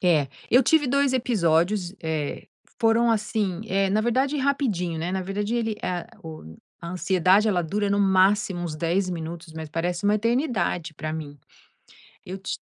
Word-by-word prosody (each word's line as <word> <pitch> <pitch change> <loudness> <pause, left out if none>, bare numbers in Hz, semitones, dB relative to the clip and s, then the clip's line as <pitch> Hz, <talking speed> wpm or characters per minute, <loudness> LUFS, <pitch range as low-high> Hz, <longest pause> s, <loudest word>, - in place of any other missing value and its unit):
É, 155 -7 +3 0.2
eu 255 +3 +6
tive 315 +2 +3
2 280 +1 +2
episódios, 185 -5 +1
eh, 155 -3 -3 0.3
foram 230 +1 +4
assim 210 -4 -1
eh, 195 0 +1
na 215 - +2
verdade, 260 +6 +1
rapidinho, 235 - 0
né. 170 +3 -2
Na 190 - -1
verdade, 205 +4 -2
ele 225 -2 0
é 180 -1 -3 0.2
o 155 - -10 0.2
a 170 - -7
ansiedade, 185 +3 +3
ela 180 -4 +2
dura 205 +5 -1
no 200 0 +1
máximo 190 0 +3
uns 170 -3 -4
10 175 +4 0
minutos, 165 -1 -6
mas 160 -1 -6
parece 170 +3 -2
uma 205 +1 +4
eternidade 230 - 0
para 155 +1 -5
mim. 145 -3 -7 0.9
Eu 190 +2 -6
ti 190 - -4
190 Hz, 165 wpm, -25 LUFS, 170-220 Hz, 0.9 s, eu